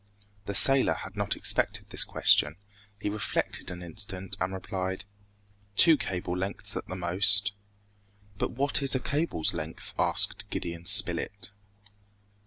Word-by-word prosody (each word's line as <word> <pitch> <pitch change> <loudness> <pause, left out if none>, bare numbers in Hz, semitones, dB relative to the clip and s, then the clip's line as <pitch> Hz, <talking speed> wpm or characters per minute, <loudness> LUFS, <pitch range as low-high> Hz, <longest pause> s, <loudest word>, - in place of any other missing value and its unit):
The 100 - -5
sailor 135 +5 +5
had 95 +2 -10
not 100 -1 -2
expected - - -1
this - - +1
question. 75 +1 +2 0.4
He - - -5
reflected 105 +1 -3
an 90 0 -8
instant 95 +1 -5
and 90 +1 -1
replied, 95 0 -5 0.7
"Two 165 - +6
cables 90 -8 -4
lengths 95 +2 -5
at - - -6
the 90 - -7
most." 100 +4 +5 0.9
"But - - -1
what 140 +4 +1
is 135 -1 +2
a - - 0
cable's 145 - +2
length?" 80 -1 -7
asked - - -1
Gideon 85 0 -6
Spilett. 100 +1 +2
95 Hz, 135 wpm, -27 LUFS, 90-105 Hz, 0.9 s, Two